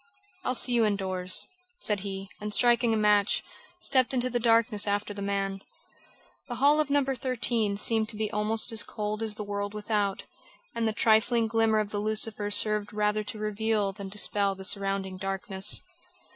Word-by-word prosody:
"I'll 255 - -1
see 250 - +3
you 235 -1 +3
indoors," 190 -3 +3 0.3
said 210 - +1
he, 195 0 -6
and 210 0 -5
striking 240 +1 +3
a 220 - +1
match, 210 -1 +2 0.4
stepped 260 -5 +1
into 250 0 -1
the 240 - 0
darkness 230 -2 +2
after 205 0 -2
the 200 - -8
man. 195 -1 -3 0.9
The 245 - -5
hall 290 +4 +3
of 305 -2 0
No. 285 -1 +2
13 245 -5 -1
seemed 220 +1 +2
to - - -4
be 215 0 -3
almost 215 +3 0
as 225 -2 +3
cold 210 0 -4
as 220 -2 0
the 210 - -5
world 205 0 -5
without, 210 -2 -2 0.5
and 230 -1 -1
the - - 0
trifling 225 +2 +2
glimmer 225 0 +1
of 210 -1 -2
the 205 - -3
lucifer 215 0 -1
served 210 0 +3
rather 210 0 0
to 215 - -5
reveal 215 -1 -1
than 195 0 -8
dispel 200 0 +1
the 190 0 -3
surrounding 195 -1 -1
darkness. 195 +1 -1
210 Hz, 175 wpm, -27 LUFS, 200-225 Hz, 0.9 s, see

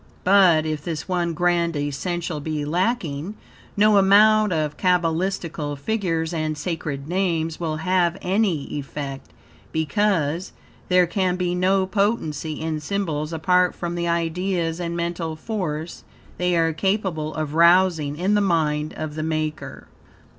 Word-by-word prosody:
But, 180 -5 +5
if 155 -1 -3
this 160 -2 -4
one 175 -2 0
grand 170 -1 +1
essential 155 +3 -3
be 150 0 -3
lacking, 175 0 -1 0.4
no 210 0 +5
amount 210 +2 +5
of 155 -3 -1
cabalistical 170 -3 0
figures 165 -2 -1
and 155 -2 -2
sacred 150 -5 -4
names 165 -3 -1
will 160 -3 -2
have 175 +1 +1
any 185 -5 0
effect, 140 -1 -5 0.4
because, 165 0 0 0.4
there 180 -1 +5
can 180 +1 0
be 180 -1 -1
no 190 +2 +2
potency 185 -7 -1
in 160 -1 -2
symbols 155 -3 -2
apart 180 +2 +2
from 175 -1 -4
the 170 0 -2
ideas 170 0 -1
and 170 -1 -3
mental 170 -1 -3
force 165 -4 -4 0.4
they 180 -1 +1
are 165 -1 +2
capable 175 -4 -1
of 155 -1 -3
arousing 170 -3 +4
in 185 +5 +1
the 205 - +3
mind 155 -5 0
of 155 -1 -4
the 155 - -4
maker. 155 -1 -3
170 Hz, 135 wpm, -23 LUFS, 155-185 Hz, 0.4 s, But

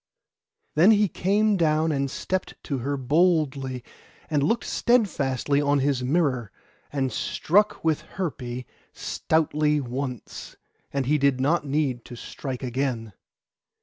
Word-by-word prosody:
Then 165 +7 +6
he 210 -1 +5
came 205 +4 +2
down 160 -1 +2
and 140 -2 0
stepped 185 +7 -3
to 140 -4 -3
her 140 +4 -2
boldly, 140 -3 +1 0.5
and 150 -2 +2
looked 195 +12 +1
steadfastly 145 - +1
on 145 0 +2
his 135 -1 +1
mirror, 130 - 0 0.4
and 135 -2 -1
struck 205 +6 +1
with 160 -2 +1
Herpé 125 -9 -4 0.3
stoutly 150 -1 +1
once; 125 -2 -5 0.4
and 140 -2 -1
he 150 +3 +2
did 140 -2 +2
not 145 +3 +1
need 135 -4 0
to 120 - -9
strike 130 +2 -6
again. 120 -4 -2
145 Hz, 125 wpm, -25 LUFS, 130-160 Hz, 0.5 s, Then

